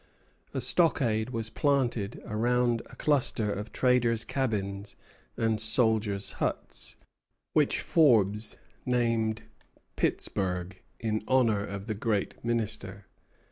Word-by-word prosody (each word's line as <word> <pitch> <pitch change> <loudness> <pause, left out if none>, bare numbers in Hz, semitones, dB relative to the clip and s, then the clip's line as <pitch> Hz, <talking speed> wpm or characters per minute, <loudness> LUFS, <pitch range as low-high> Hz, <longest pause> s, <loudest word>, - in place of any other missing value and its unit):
A 135 - -3
stockade 125 -5 +2
was 115 -2 -4
planted 125 -8 0
around 120 +1 +1
a 125 - -14
cluster 125 -7 +1
of 105 +2 -6
traders' 120 -3 +2
cabins 100 -6 -3 0.4
and 110 -2 +1
soldiers' 110 -3 +3
huts, - - -3 0.6
which - - +2
Forbes 110 - +3 0.3
named 115 -3 0 0.5
Pittsburg, 90 -1 -2 0.2
in 110 -1 -2
honor 115 -6 +3
of 100 -1 -6
the 110 - -2
great 105 -1 -2
minister. 105 -4 -1
110 Hz, 100 wpm, -28 LUFS, 105-125 Hz, 0.6 s, soldiers